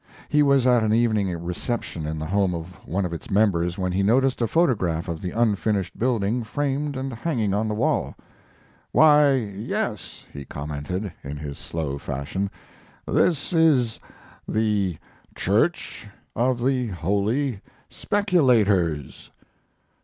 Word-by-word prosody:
He 150 - +3
was 140 -3 +4
at 125 -2 +5
an 110 0 +2
evening 110 -4 +2
reception 85 -2 -3
in 80 0 -3
the 75 - -4
home 95 0 +1
of 85 +2 -6 0.2
one 95 +4 -1
of 85 - -4
its 85 - -7
members 90 -4 +2
when 90 -1 -1
he 95 +2 0
noticed 125 +6 +2
a 115 - +2
photograph 95 - +1
of 85 -2 -4
the 90 - -3
unfinished 105 -3 0
building 120 -1 0
framed 140 +4 -2
and 130 0 -4
hanging 115 -5 -1
on 105 +2 0
the 105 - -2
wall. - - 0 0.8
"Why, 150 -2 +6
yes," 105 -2 -4
he 70 - -7
commented, 75 +8 -5
in 70 +1 -6
his 70 -1 -7
slow 75 -4 -4
fashion, 80 +11 -3 0.6
"this 170 0 +1
is 145 -9 +3 0.5
the 105 -6 0 0.4
'Church 110 - 0 0.3
of 120 +1 +1
the 130 -2 +1
Holy 100 - -1 0.3
Speculators.'" 110 - +1
105 Hz, 135 wpm, -24 LUFS, 90-130 Hz, 0.8 s, Why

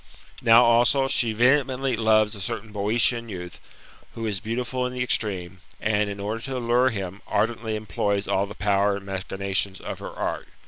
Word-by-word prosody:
" - - -18
Now, 115 +2 +9
also, 120 +3 +4
she 120 -4 +1
vehemently 130 +2 +2
loves 110 -1 +3
a 100 - -7
certain 105 +4 -5
Boeotian 115 +3 +1
youth, 90 -3 -7 0.6
who 115 - -4
'is 105 -3 0
beautiful 125 +3 -3
in 125 - -7
the 125 -1 -1
extreme, 95 -6 -1 0.2
and 105 -1 +1
[in 100 0 -6
order 105 +3 -3
to 130 +2 -4
allure 125 +1 +2
himj 95 -3 -5
ardently 110 -1 -1
employs 100 -1 -1
all 100 +1 +1
the 105 - -9
power 100 0 +2
and 100 - -10
machinations 95 0 -2
of - - -6
her - - -6
art. - - -4
110 Hz, 180 wpm, -25 LUFS, 100-120 Hz, 0.6 s, Now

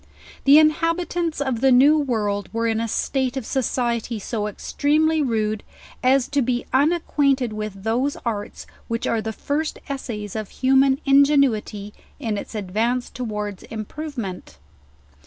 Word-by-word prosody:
The 280 +2 +8
inhabitants 330 +2 +1
of 265 -5 -1
the 270 - +5
new 275 +5 +6
world 215 -8 -1
were 230 +1 -1
in 225 -1 +1
a 230 - -1
state 260 +3 -1
of 260 - -4
society 240 -3 -1
so 210 0 -3
extremely 305 +8 +1
rude, 215 -5 0 0.4
as 260 0 +3
to 285 -1 +1
be 245 0 -1
unacquainted 275 -4 +2
with 215 -2 -6
those 250 +6 0
arts 210 -3 -4 0.2
which 230 0 -2
are 230 -1 0
tiie 220 0 -5
first 300 +2 -2
essays 230 -8 -5
of 215 -2 -4
human 265 +1 +3
ingenuity 275 -8 +3 0.3
in 220 -7 -2
its - - -9
ad 195 -4 -5
vance 240 +5 0
towards 210 -5 -4
improvement. 220 - -6
245 Hz, 140 wpm, -22 LUFS, 215-280 Hz, 0.4 s, The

